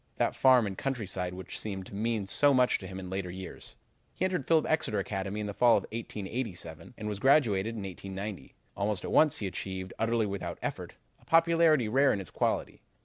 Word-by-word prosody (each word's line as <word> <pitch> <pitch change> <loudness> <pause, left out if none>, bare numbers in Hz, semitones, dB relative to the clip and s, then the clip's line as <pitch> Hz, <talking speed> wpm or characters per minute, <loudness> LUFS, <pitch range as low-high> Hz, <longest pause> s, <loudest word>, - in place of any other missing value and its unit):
that - - +1
farm 130 -3 +5
and 95 -2 -5
countryside 95 -9 -3
which 95 -1 -6
seemed 95 -3 -5
to - - -12
mean 110 0 -1
so 140 +8 +3
much 125 -1 +3
to 95 - -8
him 95 0 -7
in 95 - -7
later 95 0 -3
years. 95 +1 -9 0.4
He 185 - 0
entered 180 -8 -1
Phillips 160 -2 +3
Exeter 155 -9 +1
Academy 100 +1 -3
in - - -3
the 100 - -4
fall 120 +2 +5
of - - -2
1887, 105 -5 -5
and 105 - -5
was 105 -2 -3
graduated 115 -6 +3
in 105 - -5
1890. 95 +1 -7 0.2
Almost 100 -2 -1
at - - -4
once 155 -3 +5
he 105 - -3
achieved, 95 0 -5
utterly 115 0 +1
without 100 -2 -4
effort, - - -4 0.3
a - - -23
popularity 165 -5 +4
rare 135 +5 +4
in - - 0
its 95 - -8
quality. - - -1
105 Hz, 200 wpm, -30 LUFS, 95-130 Hz, 0.4 s, farm